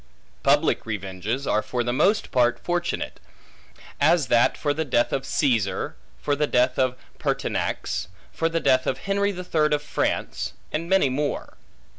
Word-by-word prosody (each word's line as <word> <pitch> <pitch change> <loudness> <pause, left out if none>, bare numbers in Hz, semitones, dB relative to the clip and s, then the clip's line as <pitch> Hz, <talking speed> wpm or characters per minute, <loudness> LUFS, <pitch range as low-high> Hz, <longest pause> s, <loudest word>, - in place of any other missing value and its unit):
Public - - +3
revenges 105 +5 -3
are 110 - +2
for 120 +2 -2
the 120 0 -1
most 200 - +2
part 120 -1 +3
fortunate; 175 0 -2 0.8
as 155 -2 +3
that 120 +1 +4
for 145 -1 0
the 160 +2 -1
death 125 -5 +1
of 135 0 -2
Caesar; 115 -9 0 0.2
for 145 - 0
the 150 +1 +1
death 125 0 +2
of 130 -1 +2 0.2
Pertinax; - - -2 0.2
for 165 - 0
the 165 0 0
death 130 -4 +3
of 130 - 0
Henry 200 +4 0
the 180 -2 -6
Third 155 -4 +1
of 145 0 0
France; - - -2 0.2
and 165 +2 -3
many 190 -6 +4
more. 145 +3 -2
140 Hz, 160 wpm, -24 LUFS, 120-165 Hz, 0.8 s, that